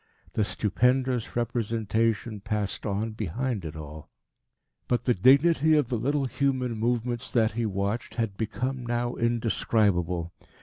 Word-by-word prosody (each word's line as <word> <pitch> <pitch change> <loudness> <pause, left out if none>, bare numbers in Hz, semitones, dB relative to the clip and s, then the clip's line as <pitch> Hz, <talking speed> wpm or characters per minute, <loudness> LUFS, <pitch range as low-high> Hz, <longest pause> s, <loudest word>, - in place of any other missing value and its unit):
The 110 - +2
stupendous 125 +4 +1
representation 115 -2 0
passed 105 -1 -3
on 105 +3 -1
behind 110 +2 -3
it 80 0 -6
all. 75 0 -9 0.8
But 120 -2 0
the 125 - +4
dignity 145 - +5
of 145 -6 +2
the 120 - 0
little 140 +4 0
human 130 -1 0
movements 120 +2 -1
that 110 -2 +2
he 115 0 -1
watched 100 +3 -2
had 115 -4 -1
become 125 +5 -3
now 120 0 -1
indescribable. 105 -7 +1
115 Hz, 130 wpm, -27 LUFS, 105-125 Hz, 0.8 s, dignity